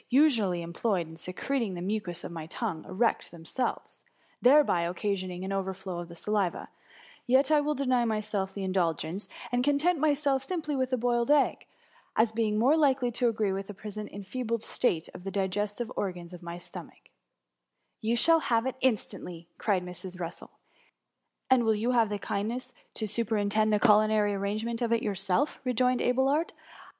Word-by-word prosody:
usually 230 Hz, -, +3 dB
employed 170 Hz, +1 st, -1 dB
in 160 Hz, -, -11 dB
secreting 195 Hz, +5 st, -2 dB
the 175 Hz, -, -5 dB
mucus 185 Hz, -3 st, -3 dB
of -, -, -6 dB
my 165 Hz, -2 st, -6 dB
tongue, 180 Hz, -3 st, -3 dB
erect 225 Hz, +5 st, 0 dB
themselves, 170 Hz, +10 st, -4 dB, 0.4 s
thereby 265 Hz, -, +5 dB
occasioning 185 Hz, +1 st, -2 dB
an 195 Hz, -, -3 dB
overflow 190 Hz, -2 st, -3 dB
of 175 Hz, -, -6 dB
the 170 Hz, -, -10 dB
saliva, 200 Hz, 0 st, -1 dB, 0.6 s
yet 265 Hz, +4 st, +4 dB
will 300 Hz, 0 st, +3 dB
I 280 Hz, -, -2 dB
deny 255 Hz, -2 st, +3 dB
myself 210 Hz, -3 st, -1 dB
the 200 Hz, -, -3 dB
indulgence, 185 Hz, 0 st, -1 dB, 0.2 s
and 245 Hz, 0 st, +1 dB
content 290 Hz, +5 st, +2 dB
myself 285 Hz, -2 st, +2 dB
simply 310 Hz, -2 st, -2 dB
with 260 Hz, -1 st, 0 dB
a 255 Hz, -, +2 dB
boiled 240 Hz, 0 st, +1 dB
egg, 295 Hz, -1 st, +3 dB, 0.5 s
as 220 Hz, 0 st, +3 dB
being 220 Hz, -1 st, 0 dB
more 250 Hz, +7 st, +5 dB
Ukely 270 Hz, -6 st, +3 dB
to 240 Hz, 0 st, +2 dB
agiee 215 Hz, -3 st, 0 dB
with 195 Hz, 0 st, -4 dB
the 205 Hz, -, -8 dB
present 210 Hz, +1 st, -7 dB
enfeebled 225 Hz, +3 st, -3 dB
state 170 Hz, -10 st, 0 dB
of 180 Hz, -, -10 dB
the 195 Hz, -, -3 dB
digestive 205 Hz, +4 st, -2 dB
organs 180 Hz, -3 st, -4 dB
of 180 Hz, -, -9 dB
my 170 Hz, 0 st, -6 dB
stomach/^ 175 Hz, -, -9 dB
^* -, -, -20 dB, 1.1 s
You 225 Hz, +2 st, +1 dB
shall 330 Hz, +7 st, +5 dB
have 230 Hz, -6 st, +1 dB
it 260 Hz, 0 st, -2 dB
instantly,^ 180 Hz, -8 st, -1 dB
cried 190 Hz, -4 st, +1 dB
Mrs. 180 Hz, +1 st, -8 dB
Russel. 170 Hz, 0 st, -6 dB, 0.5 s
'* -, -, -53 dB
And 255 Hz, -2 st, +6 dB
will 220 Hz, -1 st, +3 dB
you 225 Hz, +4 st, 0 dB
have 230 Hz, -3 st, +3 dB
the 205 Hz, -, -2 dB
kindness 215 Hz, +5 st, -3 dB, 0.2 s
to 220 Hz, -, -2 dB
super 220 Hz, +1 st, -1 dB
intend 215 Hz, +1 st, +2 dB
the 210 Hz, -, +3 dB
culinary 215 Hz, -1 st, +4 dB
arrangement 215 Hz, +4 st, -2 dB
of 235 Hz, -1 st, 0 dB
it 230 Hz, -, +2 dB
yourself?^ 200 Hz, +7 st, 0 dB
rejoined 250 Hz, 0 st, +2 dB
Abelard. 270 Hz, +6 st, +2 dB
215 Hz, 175 wpm, -29 LUFS, 190-250 Hz, 1.1 s, And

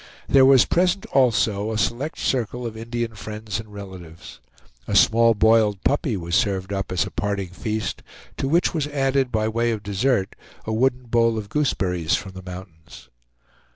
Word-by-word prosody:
There 135 Hz, -1 st, +6 dB
was 135 Hz, -2 st, +6 dB
present 180 Hz, +2 st, +1 dB
also 110 Hz, -5 st, +2 dB
a 110 Hz, -, -2 dB
select 120 Hz, +8 st, -2 dB
circle 125 Hz, -1 st, -2 dB
of 115 Hz, -2 st, -5 dB
Indian 115 Hz, 0 st, -4 dB
friends 105 Hz, -1 st, -6 dB
and 110 Hz, -1 st, -10 dB
relatives. 90 Hz, -5 st, -11 dB, 0.5 s
A -, -, -1 dB
small 115 Hz, 0 st, +5 dB
boiled 110 Hz, -2 st, +3 dB
puppy 140 Hz, -, 0 dB
was 85 Hz, -1 st, -6 dB
served 100 Hz, -2 st, 0 dB
up 95 Hz, -1 st, -3 dB
as 90 Hz, -5 st, +1 dB
a -, -, -8 dB
parting 100 Hz, -2 st, -2 dB
feast, 105 Hz, +5 st, -4 dB, 0.4 s
to 135 Hz, -, -2 dB
which 170 Hz, +5 st, +2 dB
was 155 Hz, -4 st, -1 dB
added, 135 Hz, -2 st, 0 dB
by 110 Hz, -1 st, 0 dB
way 115 Hz, +2 st, 0 dB
of 110 Hz, -3 st, -3 dB
dessert, 105 Hz, 0 st, 0 dB, 0.3 s
a 110 Hz, -, -2 dB
wooden 125 Hz, +2 st, +1 dB
bowl 115 Hz, -1 st, +1 dB
of 105 Hz, -2 st, -5 dB
gooseberries, 90 Hz, -, 0 dB
from 95 Hz, -, -5 dB
the 95 Hz, 0 st, -10 dB
mountains. 90 Hz, -7 st, -11 dB
110 Hz, 170 wpm, -23 LUFS, 100-125 Hz, 0.5 s, There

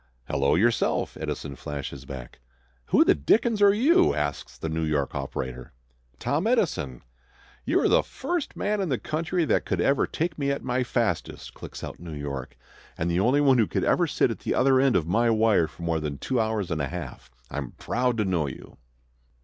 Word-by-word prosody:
"Hello 70 Hz, 0 st, +2 dB
yourself!" 115 Hz, +7 st, +1 dB
Edison 70 Hz, -2 st, -5 dB
flashes 70 Hz, +2 st, -6 dB
back. 65 Hz, -3 st, -9 dB, 0.5 s
"Who -, -, +5 dB
the -, -, +6 dB
dickens 210 Hz, -, +2 dB
are 200 Hz, -1 st, +7 dB
you?" 290 Hz, -, +4 dB
asks 75 Hz, -1 st, -3 dB
the -, -, -4 dB
New 80 Hz, +1 st, -2 dB
York 75 Hz, -3 st, 0 dB
operator. 65 Hz, -2 st, -5 dB, 0.4 s
"Tom 155 Hz, -, 0 dB
Edison." 160 Hz, -, 0 dB, 0.6 s
"You -, -, +2 dB
are -, -, +3 dB
the -, -, +5 dB
first 335 Hz, +2 st, -4 dB
man 210 Hz, 0 st, -1 dB
in 190 Hz, -, -1 dB
the 130 Hz, -, +1 dB
country, 165 Hz, +5 st, -1 dB
that -, -, +2 dB
could -, -, -2 dB
ever 140 Hz, -1 st, +2 dB
take 160 Hz, -1 st, -3 dB
me 140 Hz, -1 st, 0 dB
at 140 Hz, -, -2 dB
my 130 Hz, 0 st, 0 dB
fastest," 115 Hz, -8 st, -2 dB
clicks -, -, -9 dB
out -, -, -7 dB
New 85 Hz, -2 st, -7 dB
York, 70 Hz, -4 st, -6 dB, 0.4 s
"and 85 Hz, +2 st, -1 dB
the 85 Hz, -, +1 dB
only 125 Hz, +8 st, +3 dB
one 135 Hz, -3 st, +5 dB
who 110 Hz, -, +3 dB
could -, -, -1 dB
ever -, -, +3 dB
sit -, -, +1 dB
at -, -, -5 dB
the -, -, -2 dB
other 130 Hz, 0 st, +4 dB
end 135 Hz, -1 st, +3 dB
of 85 Hz, -4 st, +2 dB
my 115 Hz, +7 st, +2 dB
wire 110 Hz, -6 st, +3 dB
for 85 Hz, -, -12 dB
more 85 Hz, -1 st, 0 dB
than 75 Hz, -2 st, -4 dB
two 130 Hz, -, -1 dB
hours 110 Hz, -5 st, -1 dB
and 80 Hz, -2 st, -1 dB
a 70 Hz, -, -1 dB
half. 85 Hz, -6 st, -7 dB, 0.2 s
I'm 70 Hz, -4 st, -5 dB
proud 125 Hz, 0 st, -1 dB
to 105 Hz, -, +1 dB
know 85 Hz, -6 st, 0 dB
you." 65 Hz, -, -10 dB
105 Hz, 200 wpm, -26 LUFS, -, 0.6 s, are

